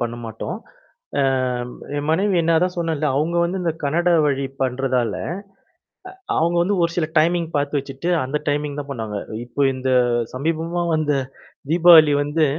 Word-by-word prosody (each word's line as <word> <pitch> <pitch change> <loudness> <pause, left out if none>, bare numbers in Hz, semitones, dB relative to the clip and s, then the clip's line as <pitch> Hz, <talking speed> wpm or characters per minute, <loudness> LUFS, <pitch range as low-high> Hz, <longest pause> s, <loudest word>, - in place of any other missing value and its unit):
பண்ண 120 0 -2
மாட்டோம். 110 -1 -5 0.6
அ - - +3 0.5
ம் - - -11 0.2
என் 145 +1 -3
மனைவி 185 +2 +2
நான் 165 -1 +4
அதான் 180 +1 0
சொன்னேன்ல. 160 -3 -1
அவுங்க 160 +4 0
வந்து 180 +2 -2
இந்த 165 - 0
கன்னட 170 +5 +1 0.2
வழி 140 -1 0 0.2
பண்றதால, 125 -3 0 1.2
அ - - 0
அவுங்க 170 +2 +1
வந்து 200 +2 0
ஒரு 170 - 0
சில 160 -3 0
டைமிங் 170 +1 +2
பாத்து 145 0 0
வச்சுட்டு, 135 +5 -5
அந்த 140 +3 -2
டைமிங் 145 0 -1
தான் 140 0 -8
பண்ணுவாங்க. 110 -5 -4 0.3
இப்ப 135 +3 0
இந்த 130 0 -1 0.4
சமீபமா 165 +5 -2
வந்த 150 -2 0 0.6
தீபாவளி 165 -3 +7
வந்து 150 +2 +1
150 Hz, 155 wpm, -21 LUFS, 135-170 Hz, 1.2 s, தீபாவளி